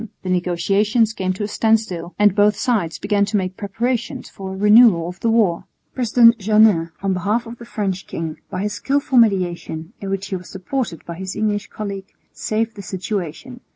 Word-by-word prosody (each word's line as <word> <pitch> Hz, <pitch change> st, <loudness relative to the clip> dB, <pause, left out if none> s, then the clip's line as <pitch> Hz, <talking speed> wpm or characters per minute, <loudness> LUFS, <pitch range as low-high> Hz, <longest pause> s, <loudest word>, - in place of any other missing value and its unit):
The 185 Hz, -, -2 dB
negotiations 195 Hz, +6 st, +1 dB
came 185 Hz, -3 st, -2 dB
to 195 Hz, -, -5 dB
a -, -, -1 dB
standstill, 210 Hz, -6 st, 0 dB
and 205 Hz, -2 st, +4 dB
both 210 Hz, +1 st, +3 dB
sides 210 Hz, -11 st, -1 dB
began 200 Hz, 0 st, +1 dB
to 205 Hz, +1 st, -1 dB
make 185 Hz, -1 st, -2 dB
preparations 230 Hz, +4 st, -3 dB
for 190 Hz, -1 st, -7 dB
a 190 Hz, -, -6 dB
renewal 210 Hz, -4 st, +6 dB
of 180 Hz, 0 st, -8 dB
the 230 Hz, -, 0 dB
war. 215 Hz, -7 st, +2 dB, 0.3 s
President 235 Hz, -1 st, +4 dB
Jeannin 210 Hz, -5 st, +4 dB
on 195 Hz, -1 st, +1 dB
behalf 205 Hz, +6 st, -1 dB
of 230 Hz, +1 st, -10 dB
the 235 Hz, -, -10 dB
French 195 Hz, -5 st, -3 dB
king, 160 Hz, -1 st, -5 dB
by 185 Hz, +1 st, -3 dB
his 210 Hz, 0 st, -2 dB
skilful 270 Hz, +3 st, +1 dB
mediation, 180 Hz, -5 st, 0 dB
in 195 Hz, -, -5 dB
which 195 Hz, 0 st, -3 dB
he 190 Hz, -, -2 dB
was 180 Hz, -1 st, -8 dB
supported 190 Hz, -1 st, -4 dB
by 170 Hz, -, -6 dB
his 190 Hz, 0 st, -5 dB
English 210 Hz, -1 st, -1 dB
colleague, 200 Hz, -2 st, -6 dB, 0.2 s
saved 225 Hz, +1 st, -2 dB
the 205 Hz, -, -7 dB
situation. 195 Hz, -, -5 dB
205 Hz, 190 wpm, -20 LUFS, 185-225 Hz, 0.3 s, renewal